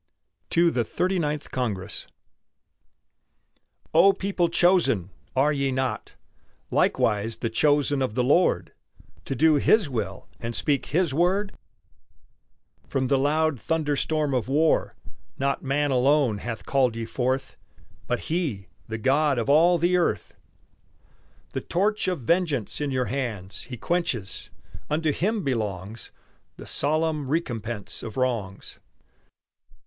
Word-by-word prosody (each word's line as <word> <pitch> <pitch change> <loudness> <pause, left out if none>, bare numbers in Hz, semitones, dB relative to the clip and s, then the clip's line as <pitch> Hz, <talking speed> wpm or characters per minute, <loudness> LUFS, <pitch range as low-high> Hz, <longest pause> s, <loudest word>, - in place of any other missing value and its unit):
TO 170 0 +3
THE 120 - 0
THIRTY 180 - -1
NINTH 150 -2 -3
CONGRESS 105 -6 -3 1.9
O 190 +5 +6
people 190 -3 0
chosen! 170 - +3 0.2
are 145 +3 +3
ye 140 -1 0
not 130 0 -3 0.6
Likewise 105 +2 +1
the 115 - -3
chosen 145 +2 +2
of 125 -5 -1
the 125 - +2
Lord, 125 - +2 0.5
To 135 - -3
do 155 +3 +4
His 195 +3 +3
will 100 -6 -4
and 115 0 -4
speak 145 -3 0
His 165 -2 +1
word? 185 +6 +1 1.3
From 130 -2 -1
the 140 - +4
loud 150 -1 +1
thunder 155 -3 0
storm 150 -1 0
of 125 -3 0
war 155 +4 +2 0.4
Not 140 +1 0
man 145 +1 0
alone 130 -3 +3
hath 115 0 -6
called 130 -4 +2
ye 115 0 -3
forth, 130 +3 -2 0.5
But 125 0 -1
He, 140 - -3 0.2
the 110 - -4
God 135 +4 +2
of 120 +3 -1
all 170 +4 +5
the 175 +2 +2
earth! 110 - -1 1.2
The - - -3
torch 210 +3 0
of 180 -6 -1
vengeance 150 - 0
in 145 - -1
your 130 -2 0
hands 110 -9 -4
He 125 - -7
quenches; 120 - -2 0.4
unto 155 +1 +1
Him 205 +8 -1
belongs 110 - -3 0.5
The - - -10
solemn 155 0 0
recompense 120 -8 -3
of 110 - -7
wrongs. 115 -7 -3
140 Hz, 130 wpm, -25 LUFS, 115-160 Hz, 1.9 s, O